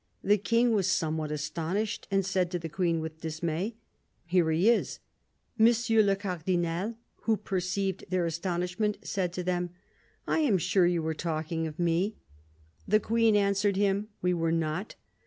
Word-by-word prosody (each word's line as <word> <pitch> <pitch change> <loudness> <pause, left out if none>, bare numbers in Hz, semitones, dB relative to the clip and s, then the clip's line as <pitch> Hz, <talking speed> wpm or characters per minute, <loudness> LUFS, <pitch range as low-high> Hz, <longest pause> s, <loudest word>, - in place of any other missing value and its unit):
The 205 +1 +4
King 230 +4 +2
was 200 -5 +2
somewhat 155 -3 0
astonished, 165 +8 -2
and 195 -1 +1
said 185 -2 +1
to 180 - -2
the 165 -1 -6
Queen 165 +1 0
with 160 0 -7
dismay: 165 +6 -3 0.2
' - - -44
Here 175 -1 +2
he 165 +6 +2
is.' 235 - +2 0.6
M. 220 - +8
le 225 -4 +3
Cardinal, 180 +1 -2 0.3
who 225 -1 +3
perceived 190 0 -2
their 185 -2 +1
astonishment, 180 +5 -1
said 185 -3 -1
to 180 - -3
them: 180 0 -1 0.3
' - - -34 0.2
I - - +2
am 265 -11 +3
sure 180 +1 +3
you 175 -2 +1
were 160 0 -1
talking 160 0 -2
of 150 - -8
me.' 175 +5 +1 0.7
The 215 +2 +4
Queen 225 0 +2
answered 200 0 +2
him: 200 +1 +1
' - - -44
We 180 0 +3
were 165 -1 0
not.' 165 +4 -2
180 Hz, 170 wpm, -29 LUFS, 165-205 Hz, 0.7 s, M